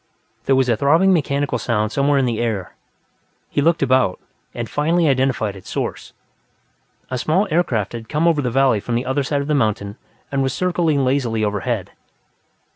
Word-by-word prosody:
There 135 Hz, -, +3 dB
was 130 Hz, -1 st, +2 dB
a 120 Hz, -, +3 dB
throbbing 160 Hz, -, +4 dB
mechanical 140 Hz, -5 st, 0 dB
sound 110 Hz, -2 st, -1 dB
somewhere 140 Hz, +2 st, +2 dB
in 135 Hz, -, +2 dB
the 115 Hz, -3 st, -1 dB
air; 110 Hz, -6 st, -2 dB, 0.8 s
he -, -, +1 dB
looked 165 Hz, 0 st, +2 dB
about, 130 Hz, -7 st, +2 dB, 0.3 s
and 120 Hz, -1 st, -5 dB
finally 160 Hz, +6 st, +1 dB
identified 130 Hz, -6 st, +1 dB
its 95 Hz, -, -12 dB
source. -, -, -4 dB, 1.0 s
A 130 Hz, -, -2 dB
small 185 Hz, -, +1 dB
aircraft 120 Hz, -, 0 dB
had 115 Hz, -1 st, -8 dB
come 155 Hz, +3 st, +1 dB
over 160 Hz, -3 st, +3 dB
the 125 Hz, -, -1 dB
valley 130 Hz, -3 st, +3 dB
from 115 Hz, +4 st, -3 dB
the 120 Hz, +2 st, -1 dB
other 130 Hz, +2 st, 0 dB
side 140 Hz, +1 st, -1 dB
of 140 Hz, -, -5 dB
the 155 Hz, -, +1 dB
mountain 105 Hz, -6 st, -1 dB, 0.3 s
and 140 Hz, -1 st, 0 dB
was 135 Hz, -1 st, -1 dB
circling 170 Hz, -6 st, +1 dB
lazily 125 Hz, -4 st, 0 dB
overhead. 105 Hz, -1 st, -2 dB
135 Hz, 180 wpm, -20 LUFS, 115-145 Hz, 1.0 s, throbbing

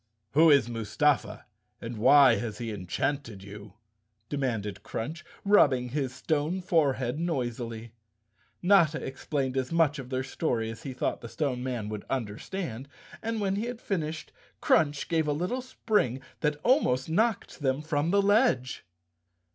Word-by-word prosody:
"Who 160 Hz, +4 st, +6 dB
is 140 Hz, -5 st, +5 dB
Mustafa 120 Hz, +5 st, 0 dB, 0.3 s
and 115 Hz, +1 st, -6 dB
why 140 Hz, +5 st, +6 dB
has 110 Hz, -3 st, -4 dB
he 115 Hz, -2 st, -4 dB
enchanted 105 Hz, +3 st, -3 dB
you?" 100 Hz, 0 st, -10 dB, 0.6 s
demanded 115 Hz, -8 st, -2 dB
Crunch, 155 Hz, +8 st, -5 dB, 0.2 s
rubbing 135 Hz, -11 st, +4 dB
his 135 Hz, -1 st, -2 dB
stone 155 Hz, +6 st, -1 dB
forehead 145 Hz, -7 st, +1 dB
noisily. 120 Hz, -8 st, -3 dB, 0.7 s
Notta 175 Hz, -5 st, +5 dB
explained 135 Hz, 0 st, -3 dB
as 130 Hz, -1 st, -1 dB
much 160 Hz, -3 st, +2 dB
of 130 Hz, -2 st, -8 dB
their 130 Hz, 0 st, -1 dB
story 120 Hz, -5 st, -2 dB
as 115 Hz, -, -10 dB
he 135 Hz, -, -6 dB
thought 125 Hz, -, -2 dB
the 115 Hz, -, -8 dB
Stone 135 Hz, -4 st, -2 dB
Man 125 Hz, -4 st, -3 dB
would 105 Hz, -1 st, -5 dB
understand, 130 Hz, -, -4 dB, 0.3 s
and 225 Hz, 0 st, -2 dB
when 195 Hz, -1 st, 0 dB
he 215 Hz, -, -1 dB
had 240 Hz, -1 st, -5 dB
finished 160 Hz, -8 st, -3 dB, 0.3 s
Crunch 145 Hz, -2 st, +2 dB
gave 160 Hz, -2 st, +1 dB
a 145 Hz, -, +1 dB
little 180 Hz, -, -2 dB
spring 210 Hz, -, 0 dB, 0.2 s
that 150 Hz, -1 st, 0 dB
almost 185 Hz, -, +3 dB
knocked 215 Hz, +6 st, 0 dB
them 135 Hz, 0 st, 0 dB
from 155 Hz, 0 st, 0 dB
the 200 Hz, +2 st, +3 dB
ledge. 205 Hz, -, +2 dB
140 Hz, 145 wpm, -28 LUFS, 120-165 Hz, 0.7 s, Who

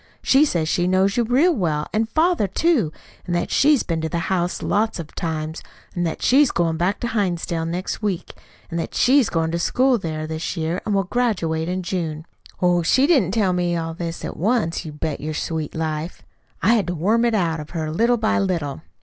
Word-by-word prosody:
She 275 Hz, +3 st, +5 dB
says 170 Hz, -, 0 dB
she 175 Hz, +2 st, +1 dB
knows 190 Hz, +2 st, +2 dB
you 240 Hz, -, +2 dB
real 270 Hz, +10 st, +3 dB
well, 160 Hz, -, -1 dB
and 220 Hz, +1 st, 0 dB
father, 320 Hz, -, +2 dB
too, 235 Hz, -, +1 dB, 0.4 s
and 175 Hz, -, -1 dB
that 175 Hz, -, -1 dB
she's 290 Hz, -2 st, +4 dB
been 165 Hz, -2 st, -2 dB
to 160 Hz, -, -2 dB
the 170 Hz, +3 st, -3 dB
house 175 Hz, -1 st, -1 dB
lots 215 Hz, +2 st, 0 dB
of 165 Hz, -3 st, -8 dB
times, 160 Hz, -1 st, -3 dB, 0.3 s
and 175 Hz, -1 st, -1 dB
that 160 Hz, -, -5 dB
she's 275 Hz, +1 st, +5 dB
going 165 Hz, -1 st, 0 dB
back 180 Hz, +5 st, 0 dB
to 240 Hz, -, -1 dB
Hinsdale 175 Hz, -5 st, -1 dB
next 180 Hz, +5 st, -3 dB
week, 200 Hz, -5 st, -3 dB, 0.4 s
and 170 Hz, -, -2 dB
that -, -, -5 dB
she 265 Hz, +3 st, +5 dB
is 250 Hz, -, +1 dB
going 165 Hz, -1 st, 0 dB
to 170 Hz, -, -1 dB
school 255 Hz, +6 st, +2 dB
there 155 Hz, -3 st, -4 dB
this 160 Hz, +3 st, -4 dB
year, 165 Hz, +3 st, -2 dB
and 210 Hz, -, +1 dB
will 195 Hz, -, +2 dB
graduate 175 Hz, -7 st, -1 dB
in 185 Hz, +1 st, -2 dB
June. 165 Hz, -4 st, -3 dB, 0.4 s
Oh, 175 Hz, -1 st, +4 dB
she 260 Hz, +11 st, +3 dB
didn't 280 Hz, -, +3 dB
tell 205 Hz, -5 st, +2 dB
me 175 Hz, -1 st, 0 dB
all 165 Hz, 0 st, -3 dB
this 165 Hz, 0 st, -5 dB
at -, -, -6 dB
once, 200 Hz, -4 st, 0 dB
you 155 Hz, -, -6 dB
bet 150 Hz, 0 st, -4 dB
your 155 Hz, +1 st, -4 dB
sweet 160 Hz, -2 st, -3 dB
life. 160 Hz, +1 st, -3 dB, 0.4 s
I 225 Hz, -, +5 dB
had 215 Hz, -5 st, +1 dB
to 175 Hz, -, -2 dB
worm 210 Hz, +9 st, +2 dB
it 235 Hz, -2 st, +2 dB
out 165 Hz, -5 st, 0 dB
of 150 Hz, -, -8 dB
her 160 Hz, -2 st, -3 dB
little 235 Hz, +8 st, +2 dB
by 220 Hz, 0 st, +1 dB
little. 165 Hz, -7 st, -2 dB
175 Hz, 220 wpm, -22 LUFS, 160-220 Hz, 0.4 s, She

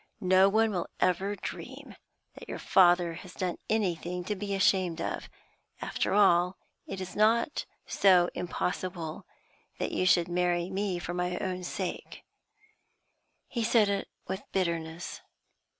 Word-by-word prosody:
'No 190 Hz, -1 st, +5 dB
one 220 Hz, +2 st, +3 dB
will 180 Hz, -4 st, -2 dB
ever 190 Hz, +3 st, +1 dB
dream -, -, -8 dB, 0.4 s
that -, -, -12 dB
your -, -, -4 dB
father 175 Hz, -2 st, +4 dB
has 180 Hz, +2 st, -10 dB
done 180 Hz, -2 st, -2 dB
anything 180 Hz, -4 st, -1 dB
to 210 Hz, +4 st, -2 dB
be 200 Hz, 0 st, -3 dB
ashamed 185 Hz, -3 st, +2 dB
of. -, -, -4 dB, 0.5 s
After -, -, -1 dB
all, 180 Hz, -2 st, +4 dB, 0.3 s
it 195 Hz, -, -5 dB
is 185 Hz, -1 st, -6 dB
not 230 Hz, +6 st, +2 dB, 0.2 s
so 185 Hz, -3 st, +4 dB
impossible 180 Hz, -2 st, -3 dB, 0.5 s
that -, -, -2 dB
you 185 Hz, -, +1 dB
should 175 Hz, -2 st, +4 dB
marry 175 Hz, 0 st, 0 dB
me 195 Hz, -1 st, -1 dB
for 175 Hz, 0 st, -5 dB
my 180 Hz, 0 st, -1 dB
own 185 Hz, -1 st, -3 dB
sake;' -, -, -5 dB, 1.2 s
he 235 Hz, -3 st, -2 dB
said 220 Hz, -2 st, +4 dB
it 200 Hz, -1 st, -1 dB, 0.2 s
with 190 Hz, +2 st, -3 dB
bitterness. 170 Hz, -2 st, -2 dB
185 Hz, 135 wpm, -29 LUFS, 175-195 Hz, 1.2 s, No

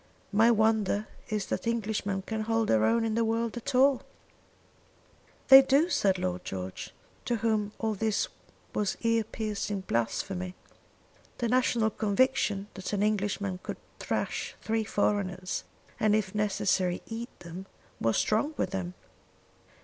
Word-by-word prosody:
My 220 Hz, +3 st, +5 dB
wonder 220 Hz, -2 st, +2 dB, 0.2 s
is 210 Hz, -2 st, -1 dB
that -, -, -3 dB
Englishman 210 Hz, -4 st, -1 dB
can 220 Hz, +2 st, -3 dB
hold 225 Hz, 0 st, 0 dB
their 110 Hz, -1 st, +4 dB
own 230 Hz, -, +3 dB
in 220 Hz, -, 0 dB
the 230 Hz, +1 st, +2 dB
world 225 Hz, 0 st, 0 dB
at 250 Hz, +3 st, -4 dB
all." 265 Hz, 0 st, +5 dB, 1.5 s
"They 270 Hz, 0 st, +12 dB
do," 275 Hz, +5 st, +3 dB
said 195 Hz, -, +2 dB
Lord 180 Hz, 0 st, -2 dB
George, 95 Hz, 0 st, -6 dB, 0.3 s
to 240 Hz, -, +1 dB
whom 215 Hz, -2 st, 0 dB
all 220 Hz, -1 st, -1 dB
this 215 Hz, +1 st, 0 dB, 0.5 s
was 205 Hz, -2 st, 0 dB
ear 230 Hz, -1 st, +2 dB
piercing 210 Hz, -2 st, -3 dB
blasphemy. 180 Hz, -, -2 dB, 0.8 s
The 235 Hz, -, -1 dB
national 240 Hz, -3 st, +2 dB
conviction 205 Hz, -2 st, +1 dB
that 190 Hz, +1 st, -6 dB
an 200 Hz, 0 st, +1 dB
Englishman 200 Hz, -2 st, 0 dB
could -, -, -5 dB, 0.2 s
thrash -, -, -2 dB
three 220 Hz, 0 st, -1 dB
foreigners, 185 Hz, -3 st, -1 dB, 0.3 s
and 215 Hz, -1 st, +4 dB
if 210 Hz, -3 st, -1 dB
necessary 195 Hz, -3 st, +1 dB
eat 230 Hz, +2 st, -7 dB
them, 175 Hz, +3 st, -8 dB, 0.3 s
was 115 Hz, -1 st, +1 dB
strong 285 Hz, +9 st, +1 dB
with 185 Hz, -, -1 dB
him. 180 Hz, -2 st, -3 dB
210 Hz, 140 wpm, -29 LUFS, 190-225 Hz, 1.5 s, They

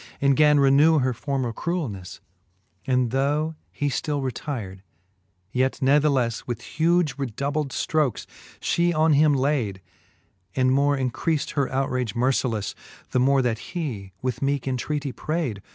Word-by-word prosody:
And 140 Hz, -1 st, +3 dB
gan 150 Hz, 0 st, +5 dB
renew 140 Hz, +4 st, +5 dB
her 130 Hz, -2 st, +1 dB
former 130 Hz, -1 st, -2 dB
cruelnefTe: 115 Hz, -, -4 dB, 0.7 s
And 125 Hz, -2 st, +2 dB
though 145 Hz, +4 st, 0 dB, 0.2 s
he 145 Hz, -, -2 dB
ftill 145 Hz, +2 st, -1 dB
retyr'd, 120 Hz, -7 st, -4 dB, 0.7 s
yet 130 Hz, +1 st, +1 dB
nathelelle 135 Hz, -4 st, +2 dB
With 120 Hz, -3 st, -4 dB
huge 165 Hz, -3 st, +1 dB
redoubled 140 Hz, +3 st, -2 dB
ftrokes 150 Hz, -5 st, 0 dB, 0.3 s
flie 175 Hz, 0 st, +1 dB
on 155 Hz, 0 st, +4 dB
him 145 Hz, 0 st, +4 dB
layd; 130 Hz, -8 st, 0 dB, 0.8 s
And 130 Hz, 0 st, +3 dB
more 140 Hz, +1 st, +3 dB
increaft 135 Hz, +4 st, -1 dB
her 140 Hz, -3 st, -1 dB
outrage 130 Hz, -3 st, -1 dB
mercileflfe, 120 Hz, -4 st, 0 dB, 0.4 s
The 125 Hz, -, +2 dB
more 135 Hz, +1 st, +3 dB
that 115 Hz, -3 st, 0 dB
he 125 Hz, -, -5 dB
with 125 Hz, -2 st, -2 dB
meeke 140 Hz, -1 st, 0 dB
intreatie 135 Hz, +2 st, -2 dB
prayd. 155 Hz, -, -3 dB
135 Hz, 135 wpm, -24 LUFS, 125-150 Hz, 0.8 s, gan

